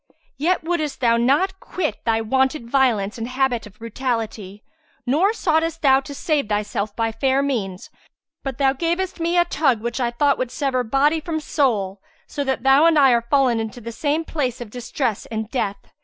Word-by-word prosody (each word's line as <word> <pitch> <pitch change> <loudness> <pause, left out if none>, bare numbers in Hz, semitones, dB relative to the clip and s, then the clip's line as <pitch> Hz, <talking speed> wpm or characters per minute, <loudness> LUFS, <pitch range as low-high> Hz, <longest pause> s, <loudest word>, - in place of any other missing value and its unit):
Yet 345 +4 +1
wouldest 320 -4 -2
thou 235 -2 +3
not 300 +11 +2
quit 345 -5 -4
thy 225 -1 +2
wonted 265 +2 0
violence 235 -5 +1
and 225 - -3
habit 255 -3 0
of 210 0 -18
brutality; 225 -4 -4 0.4
nor 315 - +3
soughtest 330 -6 0
thou 265 -1 +6
to 280 +1 -9
save 290 -6 -1
thyself 205 0 -2
by 225 -1 0
fair 265 +4 +1
means, 200 -9 -3 0.5
but 270 -3 -5
thou 270 -1 +3
gavest 345 +5 -2
me 340 +1 0
a 345 - +5
tug 280 -8 +1
which 235 +4 -4
I 240 -2 +1
thought 280 +4 +1
would 255 - -1
sever 255 0 -1
body 275 +7 +2
from 315 0 -3
soul, 210 -11 0 0.2
so 285 - -4
that 265 -2 -1
thou 270 +4 +6
and 330 -2 +4
I 275 -3 +6
are 235 -1 +3
fallen 265 -5 +3
into 225 +2 -5
the 235 0 -7
same 300 +6 -1
place 260 -7 -2
of 235 -4 -8
distress 245 -2 -3
and 220 0 -5
death. 205 -6 -1
265 Hz, 185 wpm, -22 LUFS, 230-300 Hz, 0.5 s, thou